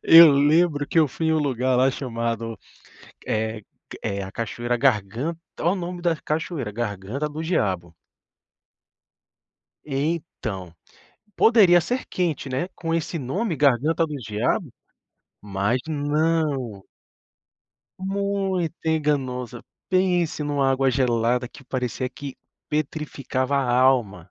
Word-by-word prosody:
Eu 165 -1 +10
lembro 145 +1 +3
que 165 - +1
eu 155 - +5
fui 160 +5 -3
em 160 - +3
um 160 - +3
lugar 130 -3 +1
lá 130 +2 +4
chamado, 115 -3 -3 0.7
eh, 110 0 -1 0.3
ca - - -9
eh, 100 0 -2
a 95 - -6
cachoeira 120 +1 -2
gargan 120 - +1 0.3
olha 170 - +3
o - - 0
nome 180 -1 -5
da 170 -1 +2
cachoeira, 155 -6 -3
Garganta 110 +6 -3
do 155 +2 -6
Diabo. 95 - -1 1.9
Então, 135 - -3 0.6
poderia 200 -7 +6
ser 250 +9 -2
quente, 165 -6 -1
né, 135 +8 -2
com 165 -1 -2
esse 165 0 -2
nome 165 - -2
Garganta 145 +4 +3
do 150 - -6
Diabo, 125 - -1 0.7
mas 100 +4 0
não 145 -7 0 1.2
muito 195 -3 -1
enganosa, 135 -6 -1 0.3
pense 180 -4 +1
em - - -1
uma 140 -2 +2
água 135 0 +2
gelada 125 -1 +1
que 140 - -15
parecia 125 0 -2
que 135 +1 -8 0.3
petrificava 145 -3 -2
a 130 -3 +1
alma. 115 -9 +2
140 Hz, 125 wpm, -24 LUFS, 120-165 Hz, 1.9 s, Eu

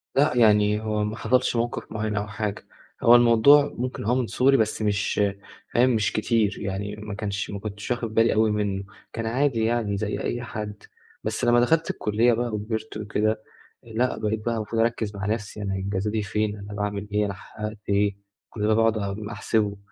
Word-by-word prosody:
لأ 145 +3 +4
يعني 105 -2 +4
هو 105 -1 -1
ما 105 +1 -2
حصلش 125 -1 +1
موقف 120 +1 -2
مُعيّن 110 -1 -2
أو 105 0 -2
حاجة، 105 -1 -4 0.4
هو 120 +1 +8
الموضوع 120 +5 +6
ممكن 125 -2 -3
هو 120 +4 +2
من 125 -3 0
صغري 135 +2 +3
بس 110 0 0
مش 105 0 0 0.5
فاهم 125 +2 +4
مش 110 -4 +1
كتير، 110 -1 +1
يعني 100 +1 -4
ما 105 -1 -7
كانش 105 -1 -3
ما 100 - -5
كنتش 105 +2 -6
واخد 115 -3 -2
بالي 115 +1 +4
أوي 110 0 +3
منه، 100 -2 -1 0.3
كان 115 -1 -3
عادي 120 -1 +1
يعني 110 -3 0
زي 105 +1 -2
أي 120 0 -2
حد، 105 -3 -6 0.4
بس - - -1
لمّا 120 0 +5
دخلت 160 +7 +2
الكلية 115 +3 +2
بقى 120 +1 0
وكبرت 110 +1 -4
وكده، 110 +1 -1 0.4
لأ 120 +2 -1
بقيت 110 +1 -2
بقى 115 -1 0
المفروض 115 +1 -1
أركز 115 -3 -1
مع 95 0 -4
نفْسي، 105 -1 -3
يعني 100 -1 -2
انجازاتي 100 +3 -1
فين؟ 105 +1 -1
أنا 100 +1 -8
باعمل 105 0 -3
إيه؟ 105 0 +2
أنا 100 - -3
حققت 105 +2 -7
إيه؟ 100 0 +2 0.3
كل 105 -1 -2
ده 110 - +4
باقعد 115 0 +3
أ 105 +2 -4
أحسبه. 105 -2 0
110 Hz, 190 wpm, -25 LUFS, 105-115 Hz, 0.5 s, هو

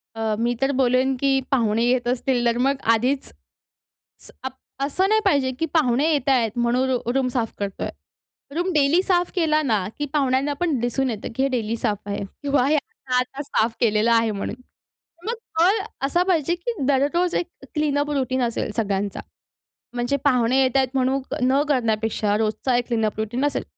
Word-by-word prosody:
अ, 220 -1 -1
मी 240 +1 +1
तर 270 +1 +2
बोलेन, 260 +1 +3
की 270 0 +2
पाहुणे 230 -3 +2
येत 245 0 +1
असतील 250 0 0
तर 235 0 +2
मग 270 +3 +2 0.2
आधीच, 255 +5 0 0.9
स - - -16
अप 260 - -4 0.3
असं 365 +7 +1
नाही 435 0 +3
पाहिजे, 280 -8 +2
की 325 - +1
पाहुणे 295 0 +3
येतायेत 260 -6 +2
म्हणून 245 +2 +1
रु 245 -2 -1
रूम 265 -1 +1
साफ 230 -3 -1
करतोय. 200 -1 -3 0.7
रूम 360 +2 0
डेली 300 +4 +4
साफ 355 -2 +1
केला 310 -3 +2
ना, 215 -9 0
की 295 - 0
पाहुण्यांना 275 0 +1
पण 325 -7 0
दिसून 245 +3 0
येतं, 215 -3 -4
की 265 - +1
हे 275 - +2
डेली 230 -3 -1
साफ 205 -2 -1
आहे 200 0 -3 0.2
किंवा 280 -3 +2
हे 305 - +3
आता 270 -3 -4
आता 260 +3 -4
साफ 230 -5 0
केलेलं 220 0 +2
आहे 230 -1 +3
म्हणून. 200 +2 -4 0.7
मग 465 - 0 0.3
कळ 385 +6 +4 0.3
असा 345 +6 +2
पाहिजे, 345 -2 +2
की 465 +7 -4
दररोज 290 +6 +2
एक 350 - +1 0.3
क्लीनअप 295 -1 +1
रूटीन 260 -2 0
असेल 230 -2 -2
सगळ्यांचा, 200 -2 -1 0.7
म्हणजे 245 +3 0
पाहुणे 255 -1 +3
येत 260 0 +2
आहेत 265 -1 +3
म्हणून 265 +1 +1 0.3
न 275 +2 +3
करण्यापेक्षा 220 -4 +1
रोजचा 220 +4 0
एक 245 - -1
क्लीनअप 220 -3 -1
रूटीन 240 +6 -1
असेल. 290 - -1
260 Hz, 175 wpm, -23 LUFS, 230-285 Hz, 0.9 s, डेली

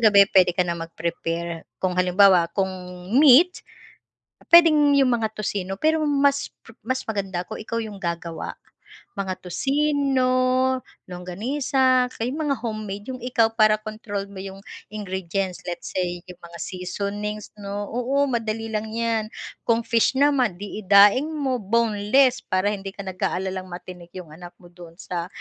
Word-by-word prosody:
gabi 205 -3 +7
pwede 180 -2 +4
ka 180 - +3
na 170 - -1
mag-prepare, 165 0 -4
kung 185 -1 -1
halimbawa, 185 -1 +5
kung 190 -1 +1 0.5
meat, 310 +6 +6 0.9
pwedeng 305 -4 +6
yung 265 -3 +4
mga 225 -2 0
toccino 195 -2 -3
pero 315 +5 +2
mas 280 0 +2 0.2
po 225 - -14
mas 260 +3 -3
maganda 195 -4 -3
kung 220 - -7
ikaw 230 +2 -4
yung 215 -3 -5
gagawa. 170 -1 -4 0.6
Mga 190 -2 -4
toccino, 275 - +1 0.8
longganisa, 255 +8 +1
o - - -17
kaya 235 +3 -2
mga 300 -3 0
homemade 215 0 -5
yung - - -10
ikaw 240 -3 +3
para 215 -1 +4
control 215 -2 -5
mo 195 - -9
yung 195 0 -8 0.3
ingredients 190 -2 -3
let's 175 - -5
say 180 -1 -1
yung 180 -2 -13
mga 170 0 -12
seasonings 200 +3 -4
'no, 200 0 -5
oo, 265 +3 +1
madali 225 -3 -2
lang 215 0 -2
'yan. 225 -1 -1 0.4
Kung 230 0 +2
fish 230 +2 +2
naman 275 -8 +3
di 205 +1 -6
daing 205 +8 +6
mo 275 -5 -1
boneless 230 +4 +2
para 185 +2 0
hindi 195 -1 -5
ka 200 - -7
nag-aalalang 185 0 -2
matinik 175 -1 -10
yung 180 -4 -9
anak 175 +1 -11
mo 175 - -14
don 175 -1 -13
sa 175 -1 -4
205 Hz, 150 wpm, -23 LUFS, 185-250 Hz, 0.9 s, gabi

